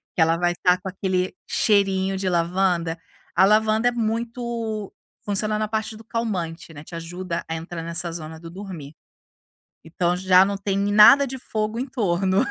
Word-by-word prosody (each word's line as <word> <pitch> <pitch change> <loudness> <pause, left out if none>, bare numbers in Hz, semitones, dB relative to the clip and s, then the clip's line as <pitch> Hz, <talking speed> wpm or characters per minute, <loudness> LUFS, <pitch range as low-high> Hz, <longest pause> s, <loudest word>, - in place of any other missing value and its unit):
que 170 - +1
ela 165 +1 +4
vai 175 0 +1
tá 180 0 +5
com 190 - -5
aquele 185 -1 -2
cheirinho 195 -2 +2
de 190 -1 -2
lavanda, 175 -1 +1 0.4
a 190 - +6
lavanda 220 +3 +3
é - - -3
muito 230 -2 -3 0.3
funciona 210 +1 0
na 215 - -1
parte 220 0 -3
do 225 - -12
calmante, 185 -9 -4
né, 145 -1 -10
te 170 - -10
ajuda 170 +1 -5
a 165 - -3
entrar 165 +1 -6
nessa 170 +1 -3
zona 160 -1 -8
do 165 0 -10
dormir. 170 -6 -9 0.9
Então 175 +1 0
já 185 0 +5
não 200 0 -2
tem 195 0 -2 0.2
nada 270 +7 +8
de 265 +1 -6
fogo 215 -1 -3
em 260 - -2
torno, 195 -6 +1
190 Hz, 175 wpm, -23 LUFS, 170-215 Hz, 0.9 s, nada